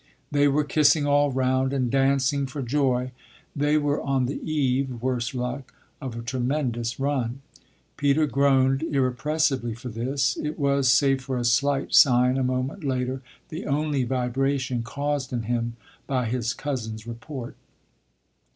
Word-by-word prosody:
They 145 0 +4
were 145 +2 +2
kissing 145 +1 +3
all 145 0 +3
round 130 +1 +1
and 130 -3 0
dancing 135 0 +2
for 135 +1 -5
joy. 130 -1 0 0.4
They 145 +1 +2
were 145 -1 0
on 135 -2 0
the 135 - -4
eve, 135 -4 0
worse 125 0 -2
luck, 125 +1 -4 0.3
of 130 -4 -5
a 115 - -6
tremendous 120 -1 -2
run. 135 -2 -1 0.6
Peter 145 +2 +3
groaned 135 -1 +3
irrepressibly 135 -3 0
for 125 +2 -8
this; 125 +4 -1
it 150 +1 -3
was, 140 -3 +2
save 135 0 +3
for 130 0 -3
a 120 - -1
slight 135 +4 +1
sign 125 0 +5
a - - +1
moment 130 +7 -2
later, 130 -1 -2 0.3
the 160 -1 -6
only 145 -1 0
vibration 130 +1 -1
caused 140 +3 -3
in 120 -2 -2
him 115 +1 -2 0.3
by 130 -3 0
his 115 0 -1
cousin's 110 -6 -4
report. 120 +2 -7
130 Hz, 145 wpm, -25 LUFS, 125-140 Hz, 0.6 s, sign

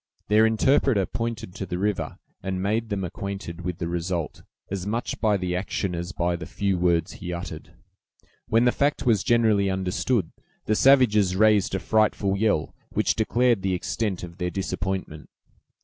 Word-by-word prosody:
Their 110 +1 +5
interpreter 110 -2 +3
pointed 115 -4 -4
to 95 - -6
the 90 - -3
river, 105 +1 -2 0.2
and 95 0 -3
made 110 +4 -1
them 100 -2 -2
acquainted 95 -1 -5
with 90 -1 -4
the 85 - -3
result, 85 -1 -3 0.3
as 100 -1 -3
much 115 +3 -2
by 105 -2 +3
the 90 -1 -2
action 95 0 -2
as 85 +1 -4
by 85 0 0
the 85 -1 -7
few 100 -1 -1
words 85 -2 +2
he 95 -7 -7
uttered. 85 0 -7 0.7
When 115 +2 +3
the 125 - +5
fact 140 +2 0
was 110 -6 +3
generally 110 -4 +3
understood, 95 +2 0 0.3
the 110 - +1
savages 110 -7 +4
raised 105 -1 +3
a - - 0
frightful 105 -2 +1
yell, 105 -6 +1 0.2
which - - +1
declared 120 0 +2
the 95 -1 0
extent 95 +1 -2
of 85 0 -9
their 90 - -1
disappointment. 95 -4 -4
100 Hz, 165 wpm, -25 LUFS, 90-110 Hz, 0.7 s, Their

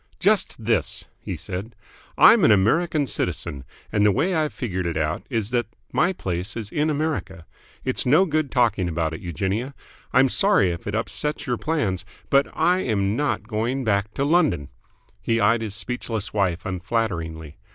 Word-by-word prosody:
"Just 195 - +1
this!" 115 -3 0
he - - -5
said. 100 +6 -6 0.4
"I'm - - +7
an - - +6
American 145 - +3
citizen, 85 - -2 0.3
and 105 - +2
the 105 - +5
way 175 - +1
I've 155 -3 +1
figured 95 -8 -3
it 85 - -2
out 80 +1 -1
is 115 -4 -2
that 120 -3 0 0.2
my 175 +4 +2
place 95 - -3
is 110 -2 -5
in 150 +1 +1
America. 145 - -2 0.4
It's 130 - -1
no 150 +9 +5
good 155 -4 0
talking 115 -8 +2
about 80 -1 -1
it, 80 - -7
Eugenia. 100 - -3 0.4
I'm 130 +1 +5
sorry 195 - +3
if 85 +2 -7
it 100 - -2
upsets 150 +6 -2
your 125 -4 -1
plans, 110 - -1 0.3
but 140 0 +4
I 175 +3 +3
am 105 - 0
not 145 -3 0
going 120 +4 -1
back 105 -2 0
to 140 - 0
London!" 145 - +2 0.5
He 115 +2 +1
eyed 115 +2 +3
his 105 -3 -4
speechless 115 -1 -3
wife 95 -4 0
unflatteringly. 85 -5 -3
110 Hz, 170 wpm, -23 LUFS, 95-140 Hz, 0.5 s, I'm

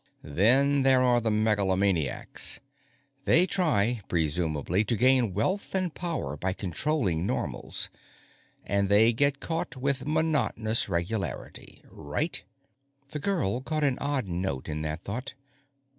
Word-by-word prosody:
_ 75 - -10
_Then 135 +8 +4
there 130 -1 +4
are 120 -1 +3
the 115 - 0
megalomaniacs. 100 - +1 0.7
They 175 +3 +5
try, 125 - +1
presumably, 80 +2 0
to 115 - 0
gain 125 -4 +3
wealth 185 - -1
and 185 -4 -1
power 165 - -3
by 95 +5 -2
controlling 95 - 0
Normals. - - -3 0.7
And 100 0 0
they 110 +3 +5
get 140 +3 +1
caught 165 -2 -3
with 135 +1 -1
monotonous 150 -9 +2
regularity. 95 +4 -4
Right?_ 75 0 -2 0.7
The 150 - -4
girl 145 - -1
caught 155 +3 -2
an 135 -3 +1
odd 140 -4 -1
note 85 -7 -3
in 75 0 -3
that 75 0 -4
thought. 125 +7 -5
110 Hz, 130 wpm, -27 LUFS, 95-140 Hz, 0.7 s, They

